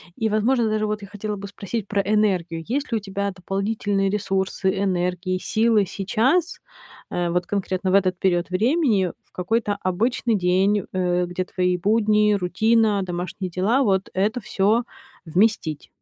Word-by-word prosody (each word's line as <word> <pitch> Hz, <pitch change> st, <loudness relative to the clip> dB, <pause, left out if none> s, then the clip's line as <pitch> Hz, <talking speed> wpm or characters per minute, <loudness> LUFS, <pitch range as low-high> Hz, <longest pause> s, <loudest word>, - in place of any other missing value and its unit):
и, 220 Hz, -1 st, 0 dB
возможно, 225 Hz, +2 st, +2 dB
даже 215 Hz, 0 st, 0 dB
вот 210 Hz, 0 st, -2 dB
я 200 Hz, -, -9 dB
хотела 210 Hz, 0 st, -4 dB
бы 200 Hz, 0 st, -7 dB
спросить 205 Hz, +2 st, -5 dB
про 200 Hz, -1 st, +1 dB
энергию. 185 Hz, -6 st, 0 dB
Есть 280 Hz, +3 st, -1 dB
ли -, -, +3 dB
у 215 Hz, -, -4 dB
тебя 200 Hz, 0 st, -3 dB
дополнительные 195 Hz, +1 st, -1 dB
ресурсы, 195 Hz, -1 st, -1 dB
энергии, 180 Hz, 0 st, -1 dB
силы 220 Hz, +1 st, +2 dB
сейчас, 250 Hz, -, 0 dB, 0.5 s
э, 175 Hz, -1 st, -1 dB
вот 175 Hz, +1 st, 0 dB
конкретно 190 Hz, -2 st, -1 dB
в -, -, +4 dB
этот 185 Hz, -2 st, +2 dB
период 175 Hz, -2 st, +1 dB
времени, 220 Hz, -, +2 dB
в -, -, -36 dB
какой-то 205 Hz, +3 st, -1 dB
обычный 225 Hz, +5 st, 0 dB
день, 190 Hz, +2 st, +2 dB
э, 180 Hz, -1 st, +1 dB
где 180 Hz, +1 st, -3 dB
твои 180 Hz, 0 st, 0 dB
будни, 210 Hz, +1 st, +3 dB
рутина, 205 Hz, +3 st, +2 dB
домашние 180 Hz, +1 st, -4 dB
дела- 210 Hz, +10 st, +1 dB
вот 190 Hz, -3 st, +1 dB
это 210 Hz, +6 st, 0 dB
всё 215 Hz, +3 st, +1 dB, 0.4 s
вместить? 175 Hz, -3 st, 0 dB
200 Hz, 155 wpm, -23 LUFS, 185-215 Hz, 0.5 s, в